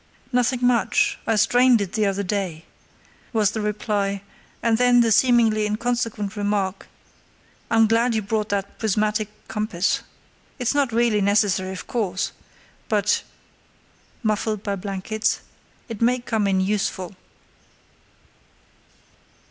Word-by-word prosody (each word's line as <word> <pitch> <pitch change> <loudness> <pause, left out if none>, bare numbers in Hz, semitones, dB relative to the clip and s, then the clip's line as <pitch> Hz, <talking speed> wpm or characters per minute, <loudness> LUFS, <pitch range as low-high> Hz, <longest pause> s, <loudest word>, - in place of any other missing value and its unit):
"Nothing 250 0 +1
much; 410 - +2
I 225 - +2
strained 245 +3 +4
it 200 -3 -3
the 215 -2 +1
other 200 +1 -1
day," 185 -5 -3 0.7
was 210 -3 +3
the 220 - -3
reply; 205 -2 -1 0.4
and 230 -1 +2
then 245 -1 +5
the 230 -1 +2
seemingly 225 -2 +4
inconsequent 220 -2 -2
remark: 205 -2 -1 0.8
"I'm 225 -1 +5
glad 230 +2 +2
you 220 - 0
brought 210 +1 -1
that 200 0 -3
prismatic 215 0 0 0.2
compass. 210 -4 -1 0.6
It's 245 -1 0
not 285 -4 +1
really 225 -2 +2
necessary, 200 -2 +2
of 185 - -7
course; 200 -5 -2 0.6
but" 210 -1 +2 1.0
(muffled 215 -1 -1
by 200 -1 -1
blankets) 200 +3 -2 0.5
"it 225 -3 -7
may 245 +2 +3
come 225 -4 -1
in 190 -1 +2
useful." 190 -1 -2
215 Hz, 120 wpm, -23 LUFS, 200-230 Hz, 1.0 s, then